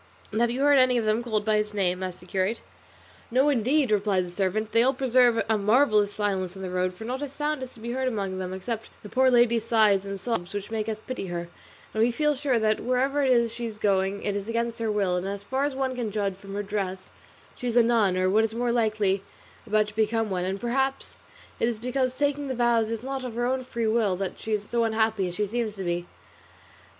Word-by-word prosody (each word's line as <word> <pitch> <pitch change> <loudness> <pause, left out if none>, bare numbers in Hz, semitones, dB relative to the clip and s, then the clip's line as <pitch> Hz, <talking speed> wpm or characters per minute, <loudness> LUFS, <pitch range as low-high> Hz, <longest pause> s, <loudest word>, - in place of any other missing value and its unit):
"And 215 +2 0
have 235 - +3
you 250 +3 -2
heard 285 -1 +5
any 255 -1 +4
of 230 - 0
them 215 +2 +2
called 215 -3 -1
by 215 -1 +3
his 210 0 -1
name?" 185 -2 0
asked 185 -2 -5
the - - -13
curate. 190 +4 -1 0.7
"No, 260 +4 +3
indeed," 265 0 +2
replied 200 -3 +2
the 175 - -9
servant; 200 +4 -1
"they 230 - +4
all 265 +3 +3
preserve 245 -3 +3
a 220 -1 +2
marvellous 210 -1 +3
silence 195 -3 -2
on 190 - -8
the 185 - -4
road, 180 0 -1
for 220 - -8
not 255 +4 -3
a 290 - -2
sound 295 +1 -3
is 260 -1 -7
to - - -14
be 235 +2 -5
heard 260 +1 -1
among 195 -6 -2
them 185 -1 -4
except 220 +4 -5
the 210 - -9
poor 260 +3 +4
lady's 235 -2 +4
sighs 215 -4 +4
and 195 0 -5
sobs, 200 -5 -3
which 205 +1 -5
make 220 -1 -2
us 215 0 -4
pity 255 -6 -4
her; 170 -1 -4 0.4
and 220 - 0
we 230 - +4
feel 300 +5 +1
sure 275 -3 0
that 215 -1 +2
wherever 265 +3 +1
it 270 - +2
is 235 -2 +3
she 235 0 -4
is 215 -2 -8
going, 195 -1 0
it 205 - -1
is 200 0 -4
against 235 0 -1
her 225 -1 0
will, 195 -4 +1
and 180 +2 -3
as 200 0 -5
far 265 +6 -1
as 290 -2 -2
one 265 -1 -1
can 240 -3 -2
judge 200 -2 -1
from 195 +1 -10
her 205 - -2
dress 195 -2 -4 0.4
she 250 - -5
is 240 0 0
a 240 - +7
nun 220 -6 +2
or, 185 0 +2
what 210 +4 +3
is 225 0 -2
more 240 0 0
likely, 215 -4 +1 0.5
about 215 0 +3
to 210 - -15
become 220 0 +1
one; 180 -1 -1
and 190 +1 -2
perhaps 265 +4 -1 0.5
it - - +2
is 235 - -3
because 255 +2 -1
taking 285 0 0
the 260 - -2
vows 235 -2 +2
is 230 0 -4
not 270 0 -4
of 245 -3 -6
her 240 +1 0
own 255 +1 0
free 235 -2 -3
will, 220 -4 +2
that 190 0 -4
she 220 - -6
is 210 -1 0
so 235 -1 +1
unhappy 220 -3 +1
as 175 - -5
she 210 - 0
seems 220 0 -2
to 195 - -5
be." 175 0 -2
220 Hz, 255 wpm, -26 LUFS, 200-245 Hz, 0.7 s, a